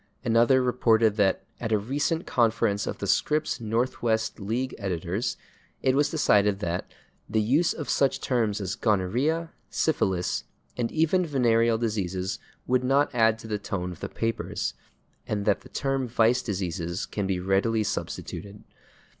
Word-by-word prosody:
Another 120 +3 +4
reported 115 -3 +3
that 100 -2 +2 0.2
"at 115 -2 -3
a 110 - +4
recent 145 - -1
conference 115 -3 +1
of - - -3
the - - -4
Scripps 150 -2 +1
Northwest 115 0 0
League 115 +6 -2
editors" 95 +3 -2 0.5
it 130 0 +3
was 145 +1 +3
decided 105 -10 +3
that 90 -3 -3 0.4
"the 110 +1 +1
use 140 +11 +3
of 150 - -5
such 140 -1 +2
terms 115 -5 0
as 95 -2 -3
/gonorrhea/, 125 - +1 0.2
/syphilis/, 95 - 0 0.3
and 120 -2 -1
even 165 +3 +2
/venereal 115 -6 +2
diseases/ 95 -4 -2 0.3
would 125 0 +2
not 135 +3 +2
add 115 -2 +3
to 110 - -10
the 105 -1 -2
tone 90 -3 -3
of 90 - -10
the - - -5
papers, 115 0 -2 0.5
and 105 -1 -2
that 105 - +2
the - - -15
term 135 -3 -1
/vice 120 +2 +3
diseases/ 90 -3 -3
can 100 -2 -3
be 95 -2 0
readily 100 +4 +1
substituted." 105 0 -5
115 Hz, 150 wpm, -26 LUFS, 100-130 Hz, 0.5 s, Another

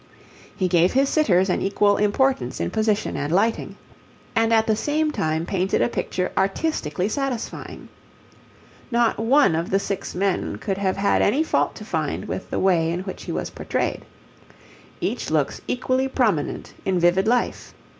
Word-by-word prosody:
He 185 - +1
gave 175 0 +3
his 270 +1 +3
sitters 190 - +3
an 180 - 0
equal 205 +1 +2
importance 260 +6 +1
in - - -2
position 215 -1 0
and 145 +1 -2
lighting, 210 +6 +1 0.6
and 225 0 +2
at 220 -1 +4
the 220 -2 +2
same 300 +6 0
time 160 - -1
painted 190 +1 0
a - - +3
picture 185 -5 -2
artistically 195 - 0
satisfying. 255 +1 -4 1.0
Not 235 -3 +2
one 235 - +4
of 165 +2 -1
the 195 - +3
six 195 -2 -4
men 190 0 0
could 195 -2 -3
have 190 -2 0
had 200 +1 +2
any 275 +10 +3
fault - - 0
to - - -9
find - - -2
with - - -5
the - - -2
way 175 -4 +2
in 175 +2 -2
which 190 0 -7
he - - -4
was - - -3
portrayed. - - -2 1.0
Each - - -2
looks - - 0
equally 255 +1 0
prominent 220 - -1
in 190 -1 0
vivid 175 +3 +3
life. 245 +1 0
200 Hz, 165 wpm, -23 LUFS, 185-240 Hz, 1.0 s, at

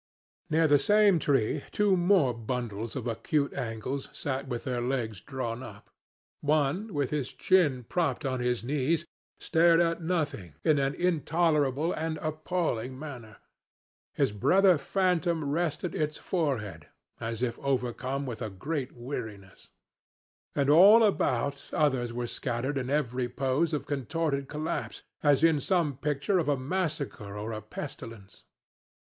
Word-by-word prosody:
"Near 160 +1 +3
the 145 -1 +5
same 205 0 +4
tree 140 -1 +1
two 205 -2 +3
more 175 -7 +3
bundles 115 -2 -4
of 130 -4 -4
acute 140 +5 -1
angles 125 +4 -4
sat 135 0 -4
with 120 -2 -4
their 125 -2 -2
legs 120 -5 -2
drawn 130 -3 -4
up. 105 -5 -11 0.5
One, 155 +8 +1
with 145 -6 -1
his 145 -4 -2
chin 150 -10 +2
propped 175 -3 -1
on 130 -1 -1
his 125 -2 0
knees, 150 +5 0 0.3
stared 165 0 +4
at 165 0 +1
nothing, 155 - -2
in 155 -2 +3
an 135 +1 0
intolerable 160 -3 +1
and 160 0 -2
appalling 155 -6 -2
manner: 125 -7 -9 0.8
his - - +2
brother 180 - +4
phantom 170 -1 +1
rested 165 +1 -1
its 150 0 -1
forehead, 110 - -2 0.3
as 115 +1 -3
if 120 -2 -2
overcome 130 +1 -1
with 125 -2 -6
a 110 - -2
great 135 - -4
weariness; 110 -6 -7 0.9
and 140 -1 +1
all 195 +10 +8
about 140 - 0
others 130 -6 +1
were 120 +1 -3
scattered 130 +3 -2
in 125 -1 -4
every 130 -4 0
pose 135 +6 0
of 150 - -2
contorted 140 0 -2
collapse, 150 +2 -4 0.2
as 145 -1 +3
in 165 -3 +5
some 165 -3 +1
picture 150 +7 0
of 155 - 0
a 145 - +2
massacre 140 - -3
or 105 +2 -4
a 110 -1 -5
pestilence. 105 -4 -9
140 Hz, 140 wpm, -29 LUFS, 120-160 Hz, 0.9 s, all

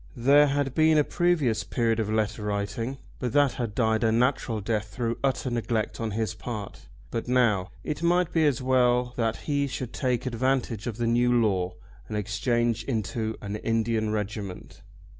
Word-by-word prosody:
There 140 +5 +6
had 140 -1 0
been 155 +1 +4
a 150 - +5
previous 155 -10 +1
period 115 -2 0
of 110 -2 -1
letter 110 0 0
writing, 105 +5 -2 0.2
but 125 -1 -2
that 145 -2 +4
had 115 -5 -4
died 110 -1 +2
a 110 - +3
natural 120 -1 +1
death 105 0 -1
through 115 +3 -3
utter 135 -1 0
neglect 115 -1 -2
on 115 - -1
his 110 0 -2
part. 110 -3 -7 0.2
But 115 - -3
now. 115 -7 +2
It 150 0 -4
might 175 0 +2
be 160 -2 +4
as 130 -3 0
well 125 -1 +2
that 115 -2 0
he 140 -1 +1
should 125 -2 -5
take 125 -2 -1
advantage 125 -3 -1
of 115 -3 -4
the 120 - -1
new 120 +1 +3
law 95 -5 0 0.3
and 105 - -3
exchange 115 +2 0
into 110 -2 -2
an 100 +1 -3
Indian 115 0 0
regiment. 105 -3 -5
115 Hz, 175 wpm, -27 LUFS, 110-130 Hz, 0.3 s, There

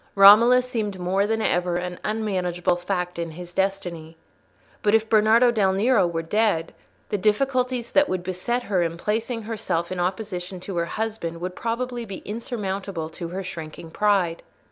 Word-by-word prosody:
Romola 225 +6 +8
seemed 220 -6 -3
more 190 +3 +1
than 225 0 0
ever 175 0 +1
an 180 0 -3
unmanageable 185 -5 0
fact 180 -1 -3
in 170 0 -2
his 175 +2 -10
destiny. 175 -4 -2 0.6
But 210 +1 +3
if 225 0 +2
Bernardo 225 +3 +5
del 200 -5 +2
Nero 210 -1 +3
were 165 -1 -3
dead, 200 -2 +1 0.4
the 205 - -1
difficulties 250 +3 +1
that 290 0 +4
would 185 -1 -2
beset 185 +7 -2
her 195 -5 0
in 165 0 -1
placing 225 +5 -2
herself 210 -6 -2
in 185 - -3
opposition 185 0 -3
to 185 -1 -5
her 170 - +1
husband 210 -4 -4
would 180 +1 -5
probably 240 +1 -3
be 195 -4 -8
insurmountable 195 -6 -4
to 170 +1 -6
her 185 +3 -5
shrinking 165 -2 -8
pride. 195 -5 +1
195 Hz, 165 wpm, -24 LUFS, 175-225 Hz, 0.6 s, Romola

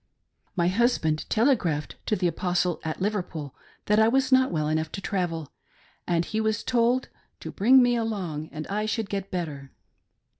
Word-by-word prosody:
My 170 -2 +2
husband 185 -7 +1
telegraphed 215 - +1
to 215 - +2
the 185 - -2
Apostle 175 0 0
at 160 -1 -4
Liverpool 180 -9 -3 0.3
that 210 +1 +3
I 220 - +5
was 260 +2 +2
not 260 0 +5
well 155 -3 -1
enough 155 0 -1
to - - -4
travel, 175 -7 -3 0.6
and 170 -1 +1
he 220 0 -2
was 220 -1 0
told 245 +1 +1 0.3
to - - -7
"bring 255 +6 +5
me 245 0 +3
along, 185 -10 -3
and 155 0 -6
I 210 +2 -2
should 220 -2 -2
get 195 -1 -3
better." 150 -7 -4
195 Hz, 165 wpm, -26 LUFS, 160-225 Hz, 0.6 s, I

